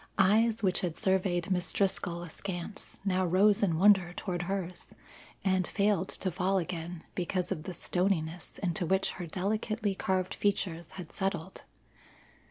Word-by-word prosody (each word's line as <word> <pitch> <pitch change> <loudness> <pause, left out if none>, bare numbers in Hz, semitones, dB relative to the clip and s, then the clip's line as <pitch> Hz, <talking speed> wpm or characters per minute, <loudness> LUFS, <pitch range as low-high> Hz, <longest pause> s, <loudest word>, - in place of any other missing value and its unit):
Eyes 220 +3 +4
which 185 -2 +2
had 175 -3 -2
surveyed 190 -2 +1
Miss 180 -1 +1
Driscoll 190 -3 0
askance 175 +3 -6
now 185 -1 +2
rose 195 +4 +4
in 175 -6 +2
wonder 190 -2 +5
toward 180 -1 -3
hers, 185 -1 -4 0.5
and 185 -2 +2
failed 200 -3 +1
to 185 - -2
fall 185 +3 +1
again 170 -1 -4
because 180 0 -1
of 160 -4 -3
the 185 - -4
stoniness 175 -2 -1
into 175 -2 -1
which 190 +2 +2
her 175 - -4
delicately 210 +4 -1
carved 185 -1 0
features 175 -5 -1
had 180 -4 -8
settled. 190 -3 -3
185 Hz, 145 wpm, -31 LUFS, 175-195 Hz, 0.5 s, wonder